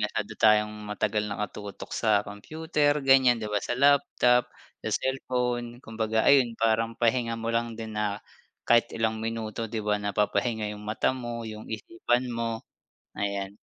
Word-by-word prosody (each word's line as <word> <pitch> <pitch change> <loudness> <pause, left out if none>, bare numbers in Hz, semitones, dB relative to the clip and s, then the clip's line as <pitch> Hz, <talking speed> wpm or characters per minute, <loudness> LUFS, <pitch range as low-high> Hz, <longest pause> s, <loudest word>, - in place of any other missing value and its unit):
masyado 105 0 -2
tayong 105 0 +4
matagal 105 0 -1
nakatutok 100 0 -6
sa 105 -3 +3
computer 150 +7 0
ganyan, 130 -3 +6
'di 110 - -3
ba, 105 - +1
sa - - -2
laptop 135 -3 +4 0.3
sa - - -1
cellphone, 125 -2 -1
kumbaga 110 0 -1
ayun 135 -4 +5
parang 115 0 +2
pahinga 115 0 +1
mo 115 - -3
lang 115 0 0
din 110 -1 -6
na 105 -1 -1 0.5
kahit 120 0 +4
ilang 110 -1 0
minuto, 115 -1 -4
'di 110 - -2
ba, 105 0 +2
napapahinga 105 +2 0
'yung 105 - -10
mata 105 +4 0
mo, 120 -2 -5
yung 110 0 -8
isipan 120 +3 -1
mo, 115 -1 -3 0.5
ayan. 100 0 -3
115 Hz, 150 wpm, -27 LUFS, 105-120 Hz, 0.5 s, ganyan